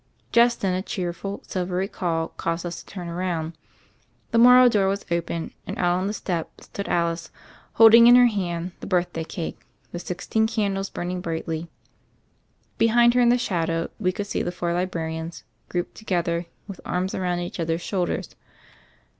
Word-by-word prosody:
Just 235 0 +4
then, 190 -2 +1
a 185 - -1
cheerful, 190 -1 -4
silvery 185 +1 -2
call 165 -5 -2
caused 165 +1 -3
us 175 -1 -4
to - - -19
turn 180 -3 -7
round. 170 -2 -3 0.8
The 230 - +3
Morrow 250 +1 +8
door 205 -5 +3
was 200 +1 -1
open, 170 -1 -2
and - - -5
out 175 0 +2
on 190 - -1
the 205 - -2
step 175 -6 -4
stood 200 - -7
Alice, 170 -1 0 0.4
holding 230 +1 +8
in 245 - +9
her 250 0 +8
hand 180 -6 -1
the - - -8
birthday 175 -2 0
cake, 165 0 -5 0.3
the 175 - -5
sixteen 200 +5 -1
candles 200 -3 -1
burn 175 +1 -4
ing 180 0 -3
brightly. 165 -1 -4 1.1
Behind 235 +1 +5
her 250 - +3
in 240 - +5
the 245 - +5
shadow 165 -7 -1
we 185 -4 +1
could 200 +2 -4
see 205 - -2
the - - -2
four 175 -1 -2
librarians 165 -2 -3 0.3
grouped 175 0 -3
together 170 -4 -2 0.2
with 195 -3 -9
arms 185 +1 -2
around 180 -2 -1
each 175 +1 -6
other's 165 0 -1
shoulders. 180 -1 -2
180 Hz, 170 wpm, -24 LUFS, 170-205 Hz, 1.1 s, in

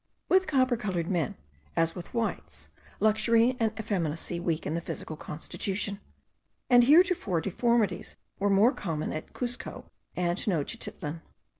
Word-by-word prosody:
With 375 0 +4
copper 260 -4 +3
coloured 185 -6 -2
men, 165 -7 0 0.4
as 165 0 +2
with 175 -2 -8
whites, 230 -1 -3 0.3
luxury 225 +3 +3
and 225 -2 +2
effeminacy 175 -5 -2
weaken 165 -3 -1
the 170 - -1
physical 160 - -5
constitution, 195 +6 -3 0.7
and 245 -1 +8
heretofore 310 - +4
deformities 210 +1 0 0.2
were 205 +1 +2
more 200 +5 +5
common 160 -5 -3
at 155 - -6
Cuzco 245 -1 -5 0.3
and 175 0 0
Tenochtitlan. 160 -2 -3
200 Hz, 125 wpm, -29 LUFS, 170-235 Hz, 0.7 s, and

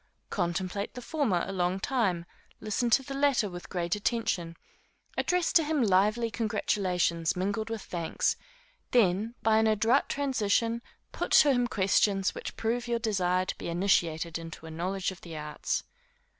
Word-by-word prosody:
Contemplate 185 +3 -2
the - - -5
former 235 - 0
a 195 - -5
long 180 0 0
time; 195 -8 0 0.3
listen 225 +3 -1
to 270 +4 +4
the 275 - -6
latter 275 -5 +2
with 175 -2 -8
great 175 -1 -1
attention; 200 -6 -1 0.6
address 360 -1 +1
to 330 - +6
him 300 -3 +1
lively 215 +3 +2
congratulations 180 -6 0
mingled 200 +4 -2
with 225 -3 -4
thanks; 170 -2 -1 0.5
then, 220 0 +2
by 220 -1 +4
an 220 - +3
adroit 225 +5 +3
transition, 235 -4 0 0.3
put - - -3
to 290 - +7
him 245 -2 +2
questions 195 -2 +2
which - - -7
prove 235 +2 -1
your 235 0 +1
desire 185 -5 +1
to - - -3
be - - -4
initiated 170 -2 +1
into 165 -1 -9
a 160 - -8
knowledge 185 +4 -2
of 190 - -12
the 165 -2 -8
arts. 150 0 -3
200 Hz, 155 wpm, -29 LUFS, 180-235 Hz, 0.6 s, to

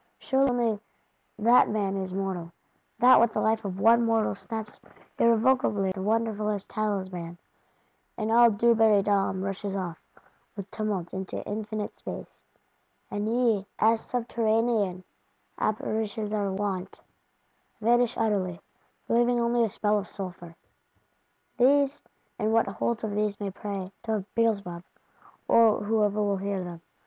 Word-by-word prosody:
Sure 270 +1 +1
only 235 -4 0 0.6
that 235 +3 +5
man 200 -2 -1
is 190 -1 -3
mortal; 185 -3 -3 0.5
that 250 +1 +7
with 235 -1 +3
the - - 0
life 220 0 +1
of 190 -2 -5
one 230 +3 +5
mortal 225 -1 +1
snaps 220 +1 -7 0.4
irrevocably 230 -4 +3
the 190 0 -5
wonderfulest 215 -1 -1
talisman, 185 -5 -3 0.8
and 215 +1 -2
all 235 +1 +7
Dubarrydom 205 -3 +3
rushes 195 0 -4
off, 175 -4 -4 0.5
with 200 -1 -8
tumult, 205 -6 -3
into 190 -1 -5
infinite 210 0 -4
Space; - - -8 0.7
and 205 +1 -2
ye, 225 -4 +1
as 225 +1 +3
subterranean 225 -5 0 0.6
Apparitions 215 0 -2
are 200 -2 0
wont, 190 -1 -3 0.8
vanish 240 +2 +2
utterly,—leaving 220 +4 -1
only 235 0 +2
a 225 - +1
smell 210 +1 +1
of 205 - -7
sulphur! 175 -4 -8 1.0
These, 275 +2 +3 0.4
and 215 -1 +1
what 225 0 +3
holds 230 +4 -2
of 215 - -2
these 210 0 -1
may 200 -2 -3
pray,—to 200 +2 -5
Beelzebub, 200 -7 0 0.7
or 225 -3 +5
whoever 210 -1 +1
will 200 -1 0
hear 195 -1 -3
them. 170 -2 -8
210 Hz, 125 wpm, -27 LUFS, 195-230 Hz, 1.0 s, that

